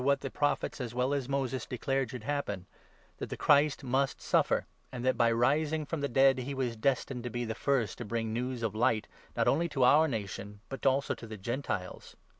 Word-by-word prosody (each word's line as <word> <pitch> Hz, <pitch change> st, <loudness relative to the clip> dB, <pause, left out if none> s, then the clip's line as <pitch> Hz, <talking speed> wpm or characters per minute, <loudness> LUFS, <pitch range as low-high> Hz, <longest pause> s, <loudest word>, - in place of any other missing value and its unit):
265 140 Hz, +2 st, +3 dB
what 140 Hz, -, 0 dB
the 135 Hz, -, -5 dB
Prophets, 145 Hz, -1 st, 0 dB
as 120 Hz, -1 st, -5 dB
well 125 Hz, +3 st, +1 dB
as 140 Hz, -2 st, -2 dB
Moses, 135 Hz, -3 st, -1 dB
declared 135 Hz, +1 st, -1 dB
should 125 Hz, -2 st, -7 dB
happen 110 Hz, -9 st, -2 dB, 0.3 s
— -, -, -32 dB
that -, -, -4 dB
the -, -, -5 dB
Christ 145 Hz, -1 st, +4 dB
must 135 Hz, +2 st, 0 dB
suffer, -, -, +2 dB, 0.3 s
and 125 Hz, -1 st, -5 dB
that, 130 Hz, -, +3 dB
by 115 Hz, -1 st, +3 dB
rising 150 Hz, +6 st, +2 dB
from 155 Hz, +1 st, -3 dB
the 140 Hz, -, +1 dB
23 135 Hz, +3 st, +3 dB
dead, 135 Hz, -1 st, +6 dB
he 140 Hz, +2 st, -4 dB
was 125 Hz, -3 st, -1 dB
destined 130 Hz, +1 st, 0 dB
to 125 Hz, -, -3 dB
be 120 Hz, +1 st, -3 dB
the 110 Hz, -, -2 dB
first 120 Hz, -3 st, 0 dB
to -, -, -3 dB
bring 115 Hz, 0 st, -2 dB
news 125 Hz, 0 st, -2 dB
of 110 Hz, -3 st, -1 dB
Light, 110 Hz, -1 st, +1 dB, 0.3 s
not -, -, +2 dB
only 170 Hz, +4 st, +2 dB
to 135 Hz, -4 st, +1 dB
our 150 Hz, +5 st, +6 dB
nation, 105 Hz, -, -5 dB
but 135 Hz, -1 st, -2 dB
also 135 Hz, +1 st, +2 dB
to 115 Hz, -, -10 dB
the 110 Hz, 0 st, -7 dB
Gentiles." 105 Hz, -3 st, -4 dB
130 Hz, 230 wpm, -31 LUFS, 115-140 Hz, 0.3 s, dead